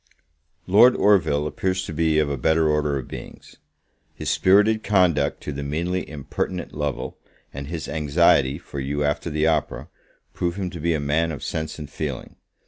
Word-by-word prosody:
Lord 110 +7 +6
Orville 80 -8 +3
appears 95 +4 -1
to 80 - -6
be 80 0 +1
of 75 -1 +3
a 70 - -2
better 80 +4 +2
order 75 -2 +1
of 65 - -6
beings. - - -10 0.6
His - - -2
spirited 105 +3 +4
conduct 90 -10 +2
to - - -4
the 70 0 -5
meanly 85 +6 -2
impertinent 75 +4 -4
Lovel, 75 -2 -4 0.3
and 70 0 -6
his 80 0 -5
anxiety 75 -2 +3
for 70 -4 -8
you 70 +2 -2
after 75 +3 -1
the 75 0 0
opera, 80 -3 -1 0.4
prove 85 -1 -2
him 95 -3 -3
to 85 - -7
be 85 +1 +1
a - - -1
man 75 +3 0
of 75 - -7
sense 80 -1 -4
and 75 -2 -7
feeling. 70 -2 -6
80 Hz, 175 wpm, -23 LUFS, 75-85 Hz, 0.6 s, Lord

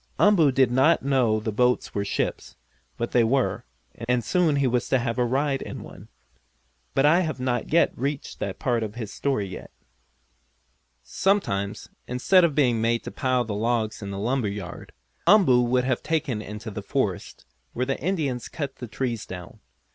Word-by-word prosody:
Umboo 175 -9 +5
did 130 -2 +3
not 135 +7 +4
know 125 -6 +2
the 110 +1 -3
boats 125 +3 +1
were 100 - -1
ships, 100 - -3 0.4
but 120 - -3
they 120 - +4
were, 130 +3 0 0.4
and 125 -1 +2
soon 170 +2 +2
he 140 -1 +2
was 125 -1 0
to 130 - +4
have 120 0 -2
a - - +4
ride 135 +3 0
in - - -7
one. - - -12 0.9
But 135 - +4
I 160 +4 +5
have 155 -7 -2
not 125 -2 -1 0.3
reached 140 +2 -4
that 100 0 -4
part 120 -5 0
of 110 -1 -4
his 110 -4 -6
story 135 -8 -1
yet. 95 - -9 1.3
Sometimes, 100 - -1 0.2
instead 150 +9 +4
of 160 -4 +2
being 125 -6 +2
made 115 +1 +1
to - - -6
pile 130 -2 0
the 110 - -4
logs 110 +1 -1
in 100 - -5
the 100 - -5
lumber 120 +3 0
yard, 100 -3 -7 0.4
Umboo 175 -11 +6
would 125 +1 +1
be 130 - +3
taken 150 -8 -2
into 105 +2 -7
the - - -5
forest, - - -3 0.3
where 125 - -1
the 135 +1 -2
Indians 145 -8 -2
cut 140 -4 -5
the 125 - -7
trees 115 -1 -3
down. 90 -2 -9
125 Hz, 175 wpm, -25 LUFS, 110-140 Hz, 1.3 s, Umboo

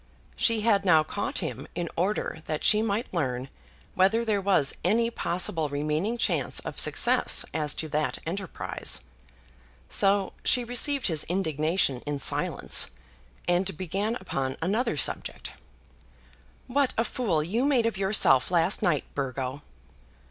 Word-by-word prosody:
She 230 -2 +2
had 205 -3 +2
now 160 -5 +5
caught 155 - -4
him 130 +2 -6
in 175 0 -2
order 180 -3 -1
that 155 -1 -3
she 210 - +4
might 220 +1 -2
learn 130 -5 -2 0.4
whether 220 +5 +2
there 210 -3 +1
was 190 -8 +2
any 230 +6 +2
possible 170 -6 0
remaining 150 +10 -1
chance - - 0
of - - -4
success - - +3
as 150 -3 -1
to 160 - -4
that 150 +1 -1
enterprise. 185 +2 -4 0.9
So 195 -1 +2
she 250 - +3
received 250 +3 +1
his 160 -5 +1
indignation 160 -5 0
in 145 -1 -1
silence, 140 - +2 0.6
and 180 0 0
began 195 +6 -2
upon 135 - -3
another 220 +8 0
subject. - - -1 1.1
"What 270 +1 0
a 225 - +3
fool 195 -11 -1
you 215 +10 -1
made 265 -5 +2
of 230 -3 0
yourself 190 -9 +3
last 175 +1 +1
night, 175 -8 +1
Burgo!" 135 0 -4
185 Hz, 135 wpm, -27 LUFS, 155-215 Hz, 1.1 s, now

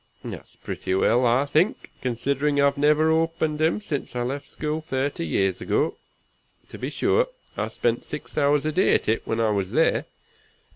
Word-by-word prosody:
That's - - -8
pretty 95 - -3
well, 120 +5 +3
I 125 +4 +3
think, 175 - +1
considering 140 +4 0
I've 140 0 +4
never 150 +2 +3
opened 160 -1 0
him 160 +5 +2
since 150 -11 -5
I 120 - 0
left 140 +3 -4
school 155 +1 -3
thirty 135 - -2
years 95 +4 0
ago. - - 0 0.7
To - - -9
be 130 - -3
sure, 445 - +2 0.3
I - - -1
spent - - -1
six - - -7
hours 145 0 +2
a 155 - +1
day 185 +5 +3
at - - 0
it 110 +1 0
when 115 - -1
I 110 -1 +2
was 100 -3 -1
there. - - +2
140 Hz, 180 wpm, -24 LUFS, 120-155 Hz, 0.7 s, I've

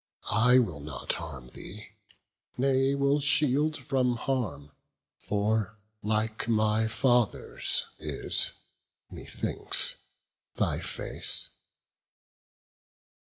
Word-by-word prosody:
I 125 +3 +5
will 90 - +1
not 70 -3 -4
harm 65 -2 -7
thee, 105 +10 -10 0.7
nay 135 +1 +2
will 140 +1 +2
shield 150 +1 +2
from 130 -4 0
harm, 115 - -3 0.5
For 105 +1 -1 0.2
like 110 +1 -1
my 110 -1 +2
father's 120 - +1
is, - - +2 0.6
methinks, - - +1 0.6
thy - - 0
face." - - -2
115 Hz, 80 wpm, -28 LUFS, 105-135 Hz, 0.7 s, I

